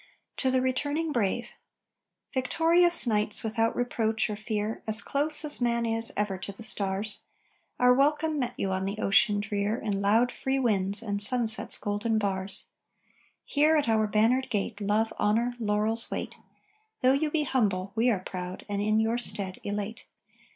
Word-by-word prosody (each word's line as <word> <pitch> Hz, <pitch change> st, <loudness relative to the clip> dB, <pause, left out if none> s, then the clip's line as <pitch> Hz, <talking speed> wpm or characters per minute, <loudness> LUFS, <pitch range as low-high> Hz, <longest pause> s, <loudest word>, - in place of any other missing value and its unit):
TO 260 Hz, -, 0 dB
THE 255 Hz, 0 st, +1 dB
RETURNING 290 Hz, +5 st, -1 dB
BRAVE 235 Hz, 0 st, -1 dB, 0.8 s
Victorious 335 Hz, +6 st, +2 dB
knights 210 Hz, -2 st, 0 dB
without 225 Hz, 0 st, 0 dB
reproach 225 Hz, -3 st, -1 dB
or -, -, -3 dB
fear 215 Hz, 0 st, -4 dB
As 220 Hz, 0 st, +3 dB
close 300 Hz, +4 st, +3 dB
as 295 Hz, -3 st, +8 dB
man 235 Hz, -1 st, 0 dB
is 225 Hz, 0 st, +1 dB
ever 200 Hz, -2 st, -2 dB
to 200 Hz, -, -6 dB
the 200 Hz, +3 st, -11 dB
stars! 205 Hz, 0 st, -1 dB, 0.6 s
Our 250 Hz, 0 st, +5 dB
welcome 300 Hz, +3 st, +1 dB
met 250 Hz, -3 st, -3 dB
you 195 Hz, -, -2 dB
on 190 Hz, 0 st, -2 dB
the 200 Hz, +2 st, -3 dB
ocean 205 Hz, 0 st, +3 dB
drear 205 Hz, +1 st, -2 dB
In 205 Hz, -5 st, -3 dB
loud, 225 Hz, +5 st, +2 dB
free 265 Hz, 0 st, -2 dB
winds 205 Hz, -5 st, +1 dB
and 205 Hz, -2 st, -2 dB
sunset's 225 Hz, 0 st, +1 dB
golden 210 Hz, +2 st, -2 dB
bars. 195 Hz, -2 st, -1 dB, 0.8 s
Here, 305 Hz, +2 st, +2 dB
at 290 Hz, -, 0 dB
our 220 Hz, -1 st, +2 dB
bannered 230 Hz, +5 st, +1 dB
gate 210 Hz, 0 st, -3 dB
Love, 210 Hz, +2 st, 0 dB
honor, 230 Hz, +4 st, +1 dB
laurels 215 Hz, +1 st, 0 dB
wait. -, -, -5 dB, 0.7 s
Though 255 Hz, 0 st, +4 dB
you 300 Hz, +3 st, 0 dB
be 300 Hz, 0 st, +1 dB
humble, 205 Hz, -9 st, -1 dB
we 235 Hz, +2 st, +2 dB
are 205 Hz, -6 st, 0 dB
proud, 185 Hz, 0 st, -7 dB
and, 205 Hz, -1 st, -3 dB
in 215 Hz, +1 st, +1 dB
your 225 Hz, +2 st, 0 dB
stead, 200 Hz, -5 st, -2 dB
elate. 205 Hz, +2 st, -5 dB
220 Hz, 165 wpm, -27 LUFS, 205-250 Hz, 0.8 s, as